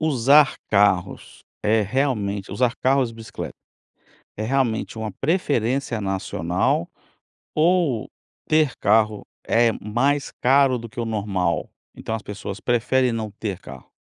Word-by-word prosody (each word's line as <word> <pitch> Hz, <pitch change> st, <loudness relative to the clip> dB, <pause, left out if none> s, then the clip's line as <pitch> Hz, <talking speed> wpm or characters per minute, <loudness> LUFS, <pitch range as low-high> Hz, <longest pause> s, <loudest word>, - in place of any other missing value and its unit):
usar 140 Hz, -1 st, +4 dB
carros, 100 Hz, -3 st, +1 dB, 0.2 s
é 110 Hz, +1 st, +3 dB
realmente, 105 Hz, -4 st, -1 dB
usar 120 Hz, +3 st, +1 dB
carros 130 Hz, -2 st, +2 dB
e -, -, -13 dB
bicicleta, 115 Hz, -1 st, -7 dB, 0.8 s
é 110 Hz, -, -4 dB
realmente 120 Hz, -2 st, 0 dB
uma 110 Hz, -1 st, -3 dB
preferência 135 Hz, -, 0 dB
nacional? 95 Hz, -3 st, -1 dB, 0.7 s
Ou 160 Hz, -7 st, +2 dB, 0.4 s
ter 155 Hz, -4 st, +2 dB
carro 110 Hz, 0 st, +2 dB, 0.2 s
é 115 Hz, 0 st, +4 dB
mais 135 Hz, +8 st, 0 dB
caro 135 Hz, 0 st, +4 dB
do 115 Hz, -1 st, -8 dB
que 115 Hz, -, -9 dB
o 115 Hz, -, -1 dB
normal, 100 Hz, -6 st, -1 dB, 0.3 s
então, 110 Hz, -, -5 dB
as 110 Hz, -, -5 dB
pessoas 105 Hz, -1 st, -7 dB
preferem 125 Hz, +1 st, +1 dB
não 110 Hz, -2 st, -3 dB
ter 100 Hz, -3 st, -5 dB
carro? 65 Hz, -7 st, -12 dB
115 Hz, 130 wpm, -23 LUFS, 105-135 Hz, 0.8 s, usar